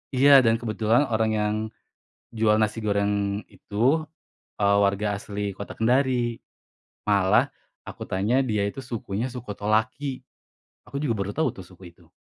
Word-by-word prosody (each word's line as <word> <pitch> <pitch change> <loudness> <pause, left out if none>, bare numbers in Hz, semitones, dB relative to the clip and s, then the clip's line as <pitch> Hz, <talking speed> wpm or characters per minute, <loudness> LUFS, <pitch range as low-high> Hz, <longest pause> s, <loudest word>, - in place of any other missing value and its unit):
Iya, 140 +1 +8
dan 115 -3 +3
kebetulan 115 +2 +1
orang 110 0 +1
yang 105 0 0 0.8
jual 110 -2 +2
nasi 110 0 0
goreng 100 -1 0
itu, 100 +1 -13 0.8
eee, 100 0 +3
warga 100 +1 0
asli 100 0 -4
Kota 100 +1 -8
Kendari. 120 0 +2 0.7
Malah 100 -2 +4 0.4
aku - - -7
tanya 110 +8 +1
dia 105 -4 0
itu 130 +6 -7
sukunya 115 0 -4
suku 125 -2 -9
Tolaki. 110 +6 -1 0.6
Aku 140 - -6
juga 145 -6 0
baru 100 0 -3
tahu 160 +6 +1
tuh, 95 - -9
suku 90 -1 -15
itu. - - -23
110 Hz, 140 wpm, -25 LUFS, 100-120 Hz, 0.8 s, Iya